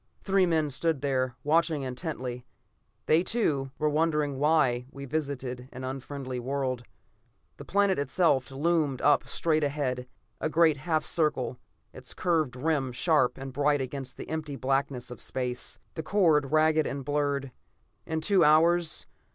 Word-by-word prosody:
Three 195 Hz, -2 st, +3 dB
men 160 Hz, -3 st, +1 dB
stood 160 Hz, +2 st, 0 dB
there, 130 Hz, -3 st, 0 dB
watching 155 Hz, -1 st, +2 dB
intently; 130 Hz, -2 st, -5 dB, 0.6 s
they 160 Hz, +2 st, +4 dB
too, 155 Hz, -, 0 dB
were 155 Hz, -, +1 dB
wondering 150 Hz, -2 st, +1 dB
why 135 Hz, -5 st, +2 dB
we 140 Hz, 0 st, -8 dB
visited 130 Hz, -4 st, -4 dB
the 130 Hz, 0 st, -6 dB
unfriendly 130 Hz, -1 st, -5 dB
world. 130 Hz, -1 st, -2 dB, 0.7 s
The -, -, -10 dB
planet 200 Hz, -4 st, +2 dB
itself 140 Hz, -1 st, +2 dB
loomed 145 Hz, -1 st, 0 dB
up 145 Hz, -, +4 dB
straight 155 Hz, -2 st, +1 dB
ahead, 135 Hz, -3 st, -2 dB, 0.3 s
a 155 Hz, -, -1 dB
great 160 Hz, -2 st, +4 dB
half 155 Hz, +2 st, -1 dB
circle, 130 Hz, -6 st, 0 dB, 0.3 s
its -, -, -8 dB
curved 160 Hz, -8 st, 0 dB
rim 135 Hz, -1 st, 0 dB
sharp 145 Hz, 0 st, +2 dB
and 135 Hz, 0 st, -7 dB
bright 145 Hz, +1 st, +2 dB
against 135 Hz, 0 st, -5 dB
the -, -, -7 dB
empty 155 Hz, -3 st, -4 dB
blackness 135 Hz, -2 st, -1 dB
of 125 Hz, -, -8 dB
space; 125 Hz, -1 st, -2 dB, 0.2 s
the 160 Hz, -, -4 dB
chord 160 Hz, -7 st, +2 dB
ragged 155 Hz, 0 st, +3 dB
and 140 Hz, -1 st, -4 dB
blurred. 145 Hz, -2 st, -1 dB, 0.6 s
In 160 Hz, 0 st, -2 dB
two 195 Hz, +3 st, +3 dB
hours 165 Hz, +2 st, +4 dB
145 Hz, 145 wpm, -28 LUFS, 130-160 Hz, 0.7 s, they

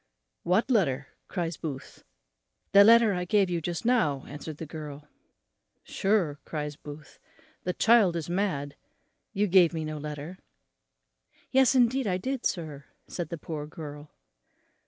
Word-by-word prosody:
"What 195 Hz, +9 st, +1 dB
letter?" 145 Hz, -, +1 dB, 0.2 s
cries 170 Hz, -3 st, -3 dB
Booth. 140 Hz, -4 st, -7 dB, 0.7 s
"The 200 Hz, 0 st, +8 dB
letter 230 Hz, 0 st, +6 dB
I 180 Hz, -1 st, -2 dB
gave 195 Hz, 0 st, +2 dB
you 170 Hz, -1 st, -1 dB
just 170 Hz, +4 st, -4 dB
now," 150 Hz, -, +2 dB
answered 150 Hz, +1 st, -8 dB
the 160 Hz, -, -6 dB
girl. 150 Hz, -1 st, -8 dB, 0.8 s
"Sure," 190 Hz, -8 st, 0 dB
cries 150 Hz, -2 st, -4 dB
Booth, 150 Hz, +1 st, -12 dB, 0.5 s
"the 180 Hz, -, 0 dB
child 220 Hz, -6 st, +4 dB
is 165 Hz, -3 st, -3 dB
mad, 170 Hz, -6 st, -2 dB, 0.6 s
you 205 Hz, +2 st, +1 dB
gave 180 Hz, -3 st, +5 dB
me 160 Hz, -1 st, -3 dB
no 155 Hz, 0 st, -5 dB
letter." 150 Hz, +4 st, -7 dB, 1.1 s
"Yes, 265 Hz, -1 st, +4 dB
indeed, 255 Hz, 0 st, +3 dB
I 180 Hz, -2 st, +1 dB
did, 260 Hz, +6 st, -1 dB
sir," 150 Hz, -5 st, -5 dB, 0.2 s
said 170 Hz, -3 st, -5 dB
the 170 Hz, -, -5 dB
poor 150 Hz, -1 st, -6 dB
girl. 150 Hz, -1 st, -9 dB
170 Hz, 140 wpm, -28 LUFS, 150-200 Hz, 1.1 s, The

